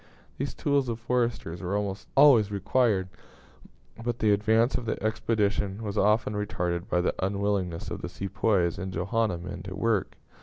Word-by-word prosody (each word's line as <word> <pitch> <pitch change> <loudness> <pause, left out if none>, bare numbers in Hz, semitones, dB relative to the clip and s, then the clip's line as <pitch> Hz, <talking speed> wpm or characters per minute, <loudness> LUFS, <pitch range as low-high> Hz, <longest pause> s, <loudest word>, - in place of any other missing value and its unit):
These - - -3
tools 140 -3 +1
of 115 -1 -3
foresters 115 -8 -1
were 95 +2 -1
almost 100 0 -4
always 135 -7 +7
required; 100 -1 +1 1.0
but 120 -1 -2
the 110 -2 +2
advance 110 +4 +3
of 120 - -2
the 110 - -1
expedition 110 -2 0
was 105 -1 -4
often 105 +1 +2
retarded 90 -2 -2
by 90 - +2
the 90 - 0
unwillingness 100 -3 -1
of - - -5
the - - -5
Sepoys 95 -3 0
and 95 -1 -4
Johanna 100 +3 0
men 90 +1 -7
to 95 0 -7
work. 105 -1 0
105 Hz, 160 wpm, -27 LUFS, 95-115 Hz, 1.0 s, always